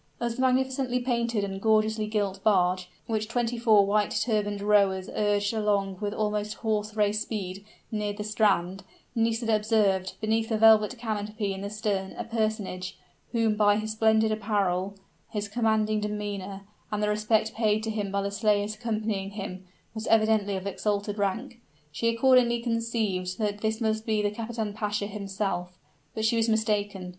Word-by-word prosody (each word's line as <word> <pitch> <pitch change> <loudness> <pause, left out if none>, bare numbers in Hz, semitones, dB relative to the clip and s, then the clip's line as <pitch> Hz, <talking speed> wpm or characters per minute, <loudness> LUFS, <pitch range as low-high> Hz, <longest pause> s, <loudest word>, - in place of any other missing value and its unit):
As 235 -1 -2
the 260 - -3
magnificently 260 -1 +1
painted 235 -3 0
and 195 -1 -4
gorgeously 220 0 +2
gilt 200 -3 -2
barge, 185 -3 +2 0.2
which 220 -1 -1
twenty 240 +1 -1
four 215 -4 +5
white 205 +1 +2
turbaned 205 -3 0
rowers 200 -3 +3
urged 205 0 +1
along 200 -3 0
with 205 -1 -1
almost 210 0 -2
horse 215 -1 -1
race 210 0 +1
speed, 195 -3 -4 0.3
neared 210 -2 -2
the 210 - -3
strand, 195 -3 +1 0.3
Nisida 225 0 +1
observed, 210 -3 +1
beneath 220 +1 0
a 220 - +1
velvet 220 +2 +5
canopy 210 -3 -3
in 190 - -6
the 200 - -4
stern, 205 -3 -2
a - - -5
personage, 215 -5 -2 0.3
who 230 -2 +2
by 210 -1 +3
his 215 0 -3
splendid 220 0 +3
apparel, 200 -3 0 0.3
his 210 -1 -3
commanding 215 -1 +1
demeanor, 205 -2 -4 0.3
and 210 0 -1
the - - +2
respect 215 +1 +1
paid 215 -1 +1
to 220 - -2
him 205 -2 -3
by 200 0 0
the 200 - -2
slaves 210 0 +1
accompanying 215 -3 -2
him, 190 -2 -7 0.3
was 220 0 -5
evidently 215 -2 +3
of 190 0 -5
exalted 205 +1 -2
rank. 230 +5 -2 0.3
She 230 +10 -1
accordingly 240 0 +4
conceived 225 -6 -1
that 210 -2 -2
this 220 0 -1
must 220 -1 -1
be 215 -1 +1
the 205 - +1
kapitan 220 -1 -4
pasha 210 -1 -2
himself. 195 -3 -3 0.4
But 220 -1 -1
she 230 +1 +2
was 225 0 +2
mistaken. 205 -4 0
210 Hz, 165 wpm, -27 LUFS, 200-220 Hz, 0.4 s, four